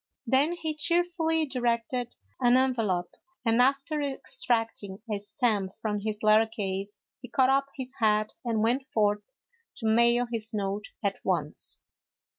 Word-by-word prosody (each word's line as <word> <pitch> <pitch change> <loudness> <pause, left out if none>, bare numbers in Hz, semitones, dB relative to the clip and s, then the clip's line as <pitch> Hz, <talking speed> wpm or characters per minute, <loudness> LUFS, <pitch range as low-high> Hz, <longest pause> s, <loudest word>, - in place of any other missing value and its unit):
Then 270 +7 +3
he 325 -3 -3
cheerfully 330 0 +1
directed 245 -2 -1 0.2
an 245 -1 +5
envelope, 225 -9 +1 0.3
and 230 +1 +4
after 275 +4 +2
extracting 225 -7 -2
a 205 - -1
stamp 205 -3 0
from 210 -2 -1
his 210 0 -4
letter 215 +1 +5
case, 200 -2 -4 0.2
he 250 - -9
caught 260 +1 +3
up 275 0 +2
his 260 -1 -5
hat 215 -1 +2
and 225 -3 0
went 255 +4 +1
forth 210 - +1 0.4
to 225 - -7
mail 235 +2 +4
his 220 -1 -3
note 200 +1 -2 0.2
at 200 -1 0
once. 165 -5 -2
230 Hz, 140 wpm, -28 LUFS, 210-265 Hz, 0.4 s, an